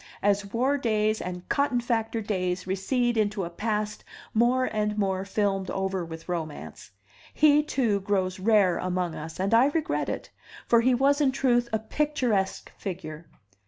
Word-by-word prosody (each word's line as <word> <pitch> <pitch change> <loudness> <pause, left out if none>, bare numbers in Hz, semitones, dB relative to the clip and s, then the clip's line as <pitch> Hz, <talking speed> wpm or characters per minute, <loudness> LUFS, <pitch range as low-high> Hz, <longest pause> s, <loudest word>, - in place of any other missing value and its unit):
As 200 0 +1
war 265 +5 +1
days 215 -3 +1
and 180 0 -6
cotton 280 -3 +1
factor 230 -1 -1
days 185 -3 -2
recede 235 +6 0
into 210 -2 0
a 170 - -5
past 210 +2 -2 0.3
more 245 +3 +3
and 210 -2 -1
more 190 -2 0
filmed 195 -1 -1
over 190 -1 -2
with 165 -1 -9
romance, 155 - -5 0.5
he 300 -1 +5
too 240 -9 0
grows 190 -1 -1
rare 200 -3 +3
among 180 -2 -1
us, 160 +2 -8
and 195 +3 0
I 235 +4 +6
regret 310 +1 -1
it, - - -5 0.3
for 235 -1 +4
he 255 +1 +3
was 280 +3 +3
in 275 -3 +4
truth 245 -3 +1
a 220 - +2
picturesque 225 -4 -1
figure. 165 -4 -6
210 Hz, 160 wpm, -27 LUFS, 185-240 Hz, 0.5 s, I